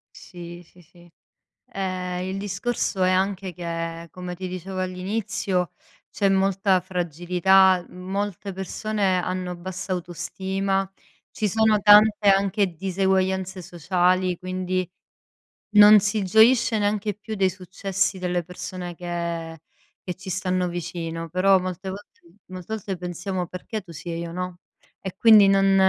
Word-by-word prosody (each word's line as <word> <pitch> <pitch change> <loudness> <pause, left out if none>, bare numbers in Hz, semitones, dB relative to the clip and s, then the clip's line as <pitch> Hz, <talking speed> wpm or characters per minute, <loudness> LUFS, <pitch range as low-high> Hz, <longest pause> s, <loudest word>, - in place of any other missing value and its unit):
Sì, 175 -1 -10
sì, 180 +1 -23
sì. 175 +1 -20 0.6
Ehm, 185 -2 -3
il 190 - -3
discorso 195 0 -2
è 185 - +3
anche 190 -1 0
che, 165 0 -5
come 180 -1 -7
ti 185 +1 -6
dicevo 185 +1 -6
all'inizio, 185 -1 -2 0.4
c'è 200 -1 +1
molta 195 0 +2
fragilità, 180 +1 +2
molte 195 +1 -4
persone 190 +1 -1
hanno 180 0 -3
bassa 190 +2 -6
autostima, 190 +2 -2 0.4
ci 210 -2 -1
sono 220 0 +3
tante 210 0 +6
anche 195 0 +3
diseguaglianze 190 +1 0
sociali, 180 +1 +1
quindi, 185 0 -3 0.8
non 210 0 +8
si 210 +1 -1
gioisce 220 +4 +4
neanche 210 0 0
più 215 +2 -8
dei 195 -2 +2
successi 190 +1 -2
delle 180 -1 -1
persone 180 0 -7
che 170 -2 -4 0.5
che 180 - -2
ci 190 +2 -10
stanno 185 0 -1
vicino. 165 -1 -5
Però 190 +3 +4
molte 185 +1 -5
volte 200 +2 -10 0.3
molte 185 +3 -7
volte 195 -3 -5
pensiamo: 180 +1 -4
"Perché 185 +5 -6
tu 185 -3 -14
si 165 +2 -8
e 165 - -3
io 170 0 -5
no?" 180 0 -5 0.4
E 190 -2 -6
quindi 215 -3 +7
non 195 0 +4
185 Hz, 130 wpm, -24 LUFS, 180-195 Hz, 0.8 s, non